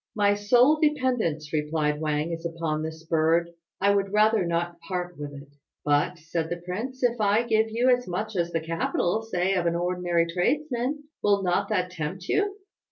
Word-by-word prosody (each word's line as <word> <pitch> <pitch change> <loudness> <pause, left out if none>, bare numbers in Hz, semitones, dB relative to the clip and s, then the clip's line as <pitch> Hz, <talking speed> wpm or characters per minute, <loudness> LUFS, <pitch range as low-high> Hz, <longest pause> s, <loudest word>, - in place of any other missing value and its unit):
"My 205 -1 +3
sole 245 +9 +4
dependence," 250 - 0
replied 150 0 0
Wang, 155 +1 -1
"is 165 0 -5
upon 165 -2 -2
this 160 0 -6
bird. 165 +1 +2 0.3
I 200 +1 +4
would 195 -1 0
rather 210 -2 +3
not 170 0 -2
part 180 0 -4
with 145 -1 -6
it." 140 0 -11 0.4
"But," 145 +4 +2
said 165 0 -3
the 175 - -2
prince, 245 +9 -5
"if 240 -2 +2
I 210 +3 +3
give 220 -1 +2
you 235 +3 +1
as 245 0 -9
much 210 +4 -3
as 170 -1 0
the 165 - -1
capital, 165 +5 0
say 190 -4 0
of 180 -3 +1
an 170 - +1
ordinary 175 -1 +1
tradesman, 255 - -1 0.2
will 200 -1 +2
not 185 +2 +1
that 180 -4 0
tempt 180 +3 -5
you?" 405 -1 +1
180 Hz, 180 wpm, -26 LUFS, 165-220 Hz, 0.4 s, sole